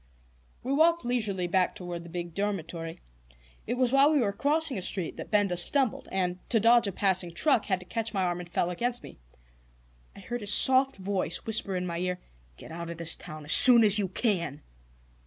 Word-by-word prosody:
We 265 Hz, -, -3 dB
walked 330 Hz, +1 st, +2 dB
leisurely 215 Hz, -7 st, -2 dB
back 180 Hz, +1 st, 0 dB
toward 175 Hz, -2 st, -8 dB
the 170 Hz, -, -12 dB
big 175 Hz, 0 st, -7 dB
dormitory. 170 Hz, -5 st, -5 dB, 0.7 s
It 240 Hz, -, -2 dB
was 250 Hz, -1 st, 0 dB
while 275 Hz, +2 st, +4 dB
we 305 Hz, -, +2 dB
were 215 Hz, -7 st, 0 dB
crossing 290 Hz, -1 st, -1 dB
a -, -, -7 dB
street 180 Hz, -2 st, 0 dB
that -, -, -9 dB
Benda 205 Hz, -4 st, +1 dB
stumbled, 255 Hz, +8 st, +1 dB
and, 180 Hz, -1 st, -2 dB
to 230 Hz, -, +3 dB
dodge 230 Hz, +1 st, +3 dB
a -, -, -3 dB
passing 185 Hz, -2 st, 0 dB
truck, 240 Hz, -, 0 dB
had 190 Hz, -2 st, -1 dB
to -, -, -12 dB
catch 225 Hz, +2 st, -5 dB
my 195 Hz, -3 st, -2 dB
arm, 175 Hz, -1 st, -2 dB
and 175 Hz, -1 st, -10 dB
fell 175 Hz, +1 st, -2 dB
against 240 Hz, +7 st, -3 dB
me. -, -, -13 dB, 1.0 s
I -, -, -13 dB
heard 240 Hz, +5 st, -6 dB
his 205 Hz, -1 st, -1 dB
soft 265 Hz, +1 st, +4 dB
voice 190 Hz, -3 st, -3 dB
whisper 215 Hz, -3 st, -1 dB
in 180 Hz, 0 st, -3 dB
my 170 Hz, -1 st, -5 dB
ear: 180 Hz, 0 st, -3 dB, 0.4 s
"Get -, -, -13 dB
out 170 Hz, +1 st, -7 dB
of 170 Hz, -, -8 dB
this 170 Hz, -1 st, 0 dB
town 155 Hz, -1 st, -11 dB
as 145 Hz, -, +8 dB
soon 245 Hz, -3 st, +9 dB
as 210 Hz, 0 st, +3 dB
you 200 Hz, -, -1 dB
can!" 170 Hz, -, -3 dB
195 Hz, 210 wpm, -27 LUFS, 175-240 Hz, 1.0 s, soon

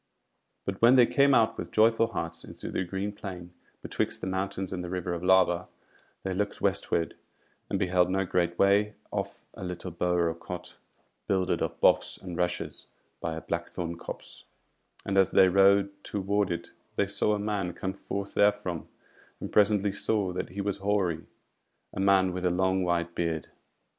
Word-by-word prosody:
But 95 Hz, -1 st, -4 dB
when 120 Hz, +3 st, +7 dB
they 125 Hz, -2 st, +7 dB
came 140 Hz, +1 st, +4 dB
out 110 Hz, -1 st, +3 dB
with -, -, -5 dB
joyful 115 Hz, +1 st, +4 dB
hearts 85 Hz, -5 st, -5 dB
into -, -, -8 dB
the -, -, -1 dB
green 95 Hz, +3 st, -3 dB
plain 90 Hz, -4 st, -8 dB, 0.3 s
betwixt -, -, -2 dB
the -, -, -3 dB
mountains 95 Hz, 0 st, -2 dB
and 90 Hz, -1 st, -3 dB
the 90 Hz, -, -5 dB
River 90 Hz, -1 st, -2 dB
of 85 Hz, 0 st, -4 dB
Lava, 90 Hz, -1 st, +4 dB, 0.6 s
they 95 Hz, -, -2 dB
looked 100 Hz, +2 st, -2 dB
westward, 85 Hz, -1 st, 0 dB, 0.5 s
and -, -, 0 dB
beheld 90 Hz, -1 st, +2 dB
no 95 Hz, +1 st, +1 dB
great 85 Hz, -1 st, 0 dB
way 100 Hz, +2 st, +3 dB, 0.2 s
off -, -, -4 dB
a -, -, -9 dB
little 90 Hz, 0 st, -5 dB
bower 85 Hz, 0 st, +1 dB
or 80 Hz, -, 0 dB
cot, 90 Hz, +2 st, -8 dB, 0.5 s
builded 95 Hz, -2 st, +1 dB
of -, -, -2 dB
boughs -, -, +3 dB
and 90 Hz, -2 st, -7 dB
rushes 90 Hz, 0 st, -2 dB, 0.3 s
by 80 Hz, -, -3 dB
a 80 Hz, -, -5 dB
blackthorn 85 Hz, 0 st, -4 dB
copse; 85 Hz, -, -9 dB, 0.6 s
and 100 Hz, 0 st, +2 dB
as 95 Hz, -, +5 dB
they 95 Hz, -, +6 dB
rode 100 Hz, +1 st, +5 dB
toward 100 Hz, 0 st, 0 dB
it 85 Hz, -, -4 dB, 0.2 s
they -, -, +2 dB
saw 105 Hz, -, +1 dB
a -, -, -3 dB
man 100 Hz, -3 st, -1 dB
come 95 Hz, +2 st, -4 dB
forth 100 Hz, +1 st, -5 dB
therefrom, 100 Hz, -5 st, +1 dB, 0.5 s
and -, -, -6 dB
presently 105 Hz, -1 st, +4 dB
saw 100 Hz, -2 st, 0 dB
that 90 Hz, -, -3 dB
he 100 Hz, +4 st, -4 dB
was 100 Hz, 0 st, -1 dB
hoary, 100 Hz, -5 st, 0 dB, 0.7 s
a -, -, -5 dB
man 95 Hz, -1 st, +4 dB
with 90 Hz, 0 st, -4 dB
a 90 Hz, -, +3 dB
long 95 Hz, +1 st, +1 dB
white 85 Hz, -1 st, 0 dB
beard. 80 Hz, -2 st, -2 dB
95 Hz, 175 wpm, -28 LUFS, 90-100 Hz, 0.7 s, when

